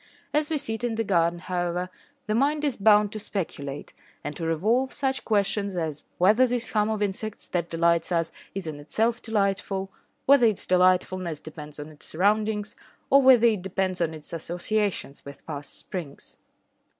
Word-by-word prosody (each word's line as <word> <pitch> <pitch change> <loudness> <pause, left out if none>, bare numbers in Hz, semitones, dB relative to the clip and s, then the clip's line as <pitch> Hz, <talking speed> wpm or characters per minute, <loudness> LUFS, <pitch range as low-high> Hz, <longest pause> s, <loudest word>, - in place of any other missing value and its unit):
As 300 +1 +2
we 315 - +1
sit 245 -5 -2
in 240 -2 0
the 225 - 0
garden, 170 -4 +2
however, 180 0 -2 0.3
the 215 - -1
mind 290 +6 +2
is 280 -4 0
bound 210 0 +4
to 215 - -5
speculate, 145 -9 -5 0.3
and 150 0 -5
to 165 - -6
revolve 220 +11 +1
such 270 -1 -1
questions 200 -2 0
as 155 -4 -3 0.2
whether 215 +8 +5
this 240 -1 -1
hum 210 0 +2
of 215 -1 0
insects 205 +2 -4
that 170 -1 -1
delights 170 +1 +2
us 165 -1 +1 0.2
is 195 -2 -4
in 155 -2 -5
itself 225 +11 0
delightful, 195 -3 -1 0.3
whether 270 -3 +6
its 215 -4 -1
delightfulness 185 -2 +2
depends 150 -1 -10
on 150 +1 -7
its 150 -2 -10
surroundings, 210 +3 +1 0.4
or 275 +1 +7
whether 255 -3 +7
it 215 -5 +3
depends 185 -1 -2
on 160 -1 0
its 155 +1 -11
associations 175 -1 -2
with 140 0 -12
past 145 -2 -5
springs. 165 -7 -7
195 Hz, 170 wpm, -26 LUFS, 170-220 Hz, 0.4 s, or